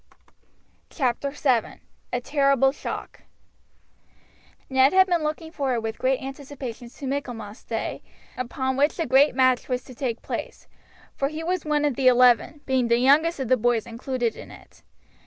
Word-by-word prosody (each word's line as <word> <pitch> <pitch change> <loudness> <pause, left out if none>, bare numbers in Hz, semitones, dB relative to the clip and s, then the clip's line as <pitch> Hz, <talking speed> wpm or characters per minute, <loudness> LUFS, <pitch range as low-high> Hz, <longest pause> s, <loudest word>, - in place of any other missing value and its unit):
CHAPTER 265 -1 -1
VII: 265 -5 0 0.3
A 245 - 0
TERRIBLE 275 -1 +3
SHOCK 285 - -7 1.5
Ned 265 +2 +4
had 375 0 +6
been 350 -3 +1
looking 310 +1 -4
forward 265 -7 -1
with 225 0 -5
great 260 0 +1
anticipations 265 -3 -8
to 280 - -7
Michaelmas 245 -6 -5
day, 225 -1 -4 0.3
upon 260 +1 -2
which 290 +3 +2
the 330 - -1
great 275 0 +4
match 255 -1 +2
was 250 -1 -1
to 255 - -12
take 240 -2 -4
place; - - -6 0.5
for 275 - -1
he 310 +3 -6
was 360 0 -2
one 300 -1 +1
of 285 -4 0
the 260 0 +2
eleven, 250 +4 +4
being 260 -2 +1
the 235 0 +3
youngest 290 +6 +3
of 265 - -2
the 255 +2 +3
boys 235 -1 +1
included 235 0 -3
in - - -11
it. - - -16
265 Hz, 160 wpm, -24 LUFS, 245-285 Hz, 1.5 s, had